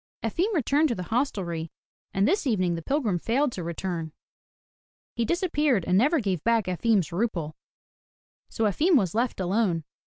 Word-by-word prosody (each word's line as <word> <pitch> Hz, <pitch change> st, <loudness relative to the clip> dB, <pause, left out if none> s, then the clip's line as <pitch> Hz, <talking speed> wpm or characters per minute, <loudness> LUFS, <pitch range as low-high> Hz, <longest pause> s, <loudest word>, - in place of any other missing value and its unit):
Efim 340 Hz, -, 0 dB
returned 295 Hz, +1 st, +2 dB
to 235 Hz, -, 0 dB
the 180 Hz, -, -5 dB
hostelry 180 Hz, -, -1 dB, 0.4 s
and 195 Hz, +1 st, +2 dB
this 380 Hz, -1 st, +1 dB
evening 185 Hz, -7 st, +1 dB
the 165 Hz, -, -4 dB
pilgrim 225 Hz, -, 0 dB
failed 260 Hz, -, +1 dB
to 185 Hz, -, -5 dB
return. 170 Hz, -1 st, -4 dB, 1.0 s
He 235 Hz, -, -1 dB
disappeared 295 Hz, -, +1 dB
and 180 Hz, -, +2 dB
never 290 Hz, -, +4 dB
gave 190 Hz, -, -2 dB
back 230 Hz, -3 st, +2 dB
Efim's 185 Hz, 0 st, +1 dB
rouble. 170 Hz, -5 st, -2 dB, 1.0 s
So 225 Hz, -, -2 dB
Efim 300 Hz, -, +3 dB
was 190 Hz, -, +2 dB
left 235 Hz, +1 st, -1 dB
alone. 185 Hz, -3 st, 0 dB
215 Hz, 155 wpm, -26 LUFS, 180-270 Hz, 1.0 s, never